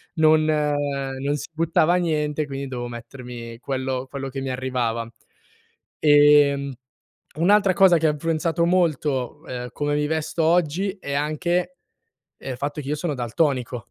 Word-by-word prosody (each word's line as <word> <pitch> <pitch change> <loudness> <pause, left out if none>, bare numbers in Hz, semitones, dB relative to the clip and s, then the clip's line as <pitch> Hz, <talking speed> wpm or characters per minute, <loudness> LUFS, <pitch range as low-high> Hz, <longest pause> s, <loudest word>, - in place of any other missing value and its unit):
Non 155 -1 +4
non 145 -2 -1
si - - -8
buttava 165 +1 +2
niente, 155 -3 0
quindi 140 -1 -5
dovevo 125 -2 -5
mettermi 120 -1 -9
quello 130 0 -3
quello 135 -1 -5
che 135 0 -5
mi 135 - -3
arrivava. 125 -3 -2 0.9
Ehm, 145 -2 +5 0.7
un'altra 195 +4 +4
cosa 190 -3 +6
che 160 - +1
ha - - +3
influenzato 165 +2 0
molto, 150 -8 0
ehm, 125 -1 -5
come 145 0 -1
mi 150 0 +1
vesto 160 +1 -2
oggi 175 +3 +2
è 140 - -4
anche, 175 +5 -1 0.6
ehm, - - -7
il - - -6
fatto 145 +2 -3
che 140 - -7
io 150 - -1
sono 155 0 -2
daltonico, 125 -2 -1
145 Hz, 145 wpm, -23 LUFS, 130-160 Hz, 0.9 s, cosa